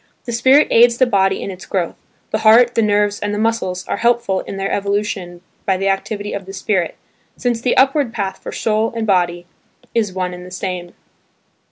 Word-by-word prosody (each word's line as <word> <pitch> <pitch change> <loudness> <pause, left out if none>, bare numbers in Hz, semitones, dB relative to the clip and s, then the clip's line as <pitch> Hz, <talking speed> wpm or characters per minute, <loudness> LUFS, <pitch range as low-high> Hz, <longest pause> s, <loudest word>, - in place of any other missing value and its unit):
The 240 - -4
spirit 260 +6 +4
aids 235 0 +5
the 255 - +4
body 195 -4 +1
in 195 - -4
its 185 0 -11
growth; 180 -4 -1 0.4
the 215 - 0
heart, 230 +3 +6
the 230 - +2
nerves 205 -1 +1
and 205 0 -2
the - - -3
muscles 215 -5 -1
are - - -2
helpful 235 -4 +1
in 195 - -7
their 195 0 -2
evolution 200 -3 -2 0.2
by 190 -1 +1
the 195 +1 0
activity 205 +1 -2
of 195 -2 -6
the 195 - -8
spirit, 190 -2 -1 0.4
since 240 -2 -1
the 245 - +1
upward 270 -1 +3
path 195 -4 -3
for - - -6
soul 220 +1 0
and 225 -1 -2
body 175 -3 +1 0.5
is 215 -4 0
one 185 -1 -3
and 180 0 -9
the 180 - -10
same. 180 -1 -5
205 Hz, 200 wpm, -18 LUFS, 190-230 Hz, 0.5 s, heart